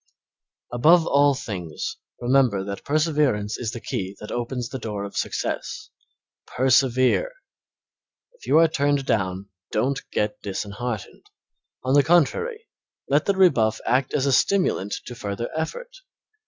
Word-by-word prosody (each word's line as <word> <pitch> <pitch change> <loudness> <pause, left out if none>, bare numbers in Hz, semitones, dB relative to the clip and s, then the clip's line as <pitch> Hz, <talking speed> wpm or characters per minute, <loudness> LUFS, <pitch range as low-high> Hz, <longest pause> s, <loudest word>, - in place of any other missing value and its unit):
Above 160 +7 +5
all 140 -1 +4
things, 90 - -5 0.2
remember 120 -6 +2
that 100 0 -6
perseverance 145 -9 +1
is 120 - -3
the 120 - -6
key 95 -2 -4
that 105 - -8
opens 120 0 -3
the 130 - -5
door 105 -3 -4
of 100 - -8
success. - - -3 0.6
Persevere! 130 - +2 1.0
If 485 - -17
you - - +4
are 165 0 +7
turned 145 -3 0
down 95 -4 -1 0.2
don't 135 +6 0
get 105 0 -1
disheartened; 105 +3 -5 0.6
on 130 +1 0
the 145 - +7
contrary, 300 - +1 0.4
let - - +3
the 200 - +1
rebuff 115 - +4
act 125 +3 +1
as 135 - +1
a 140 - +2
stimulant 180 - +2
to - - -7
further 110 -1 -5
effort. 485 - -5
130 Hz, 135 wpm, -24 LUFS, 105-150 Hz, 1.0 s, are